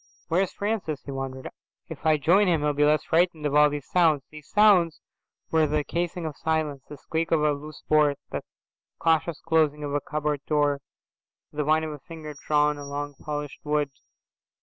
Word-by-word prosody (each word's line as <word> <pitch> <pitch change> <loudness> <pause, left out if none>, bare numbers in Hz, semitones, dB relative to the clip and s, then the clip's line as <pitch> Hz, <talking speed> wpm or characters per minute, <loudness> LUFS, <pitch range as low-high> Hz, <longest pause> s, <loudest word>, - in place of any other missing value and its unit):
"Where's 180 +3 +1
Francis?"' 200 -8 -3
he 140 - -6
wondered. 135 -1 -5 0.4
"If - - -5
I 155 -1 +5
join 180 +8 +4
him 165 -4 +2
he'll 150 0 +1
be 145 +1 +2
less 150 +1 +3
frightened 165 -2 +1
of 145 - 0
all 150 0 +6
these 145 -1 -5
sounds." 160 -6 +3
"These 150 -1 -12
sounds" 195 -6 +4 0.5
were 160 -1 +3
the 150 0 0
casing 170 +2 -3
of 155 -3 -4
silence: 155 -3 -1
the 150 - -8
squeak 160 +4 -2
of 160 -2 +2
a 150 - +4
loose 150 +1 -7
board, 150 -2 +4
the - - -3 0.6
cautious 160 0 +1
closing 150 -2 +1
of 145 -1 -3
a 145 - 0
cupboard 150 -1 -2
door, 145 -2 +2 0.7
the 150 0 -2
whine 155 +1 +3
of 155 - -3
a 150 - -8
finger 155 +1 -9
drawn 150 +1 +1
along 145 0 -5
polished 150 -1 -5
wood. 150 -1 0
150 Hz, 185 wpm, -26 LUFS, 145-160 Hz, 0.7 s, all